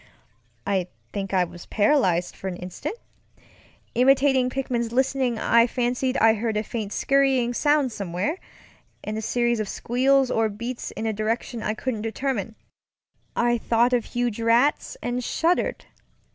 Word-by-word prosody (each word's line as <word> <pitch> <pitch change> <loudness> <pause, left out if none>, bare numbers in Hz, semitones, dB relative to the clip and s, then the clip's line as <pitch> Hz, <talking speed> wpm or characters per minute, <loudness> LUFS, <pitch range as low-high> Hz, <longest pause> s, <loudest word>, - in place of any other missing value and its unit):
I 190 -3 0 0.3
think 195 -2 -3
I 185 -2 +3
was 175 0 -9
paralyzed 195 - +2
for 190 - -7
an 185 - -3
instant. 180 - -6 1.0
Imitating 265 0 +4
Pickman's 245 -3 -2
listening, 260 -1 +1
I 235 +2 +4
fancied 250 +2 -1
I 225 0 +5
heard 220 0 -2
a 210 - 0
faint 215 -2 -5
scurrying 270 -3 +2
sound 290 0 +2
somewhere, 200 - -3 0.6
and 215 - -4
a 220 - -3
series 240 +1 0
of 210 -2 -2
squeals 265 +2 +2
or 225 -1 +2
bleats 235 +4 -5
in 225 - -6
a 220 - 0
direction 225 +2 -2
I 215 - -2
couldn't 225 -1 -3
determine. 225 -1 -3 0.8
I 240 0 +2
thought 235 +2 +2
of 240 -3 +1
huge 240 -2 -2
rats 240 - +2
and 245 +1 -2
shuddered. 335 +8 0
235 Hz, 145 wpm, -24 LUFS, 215-260 Hz, 1.0 s, I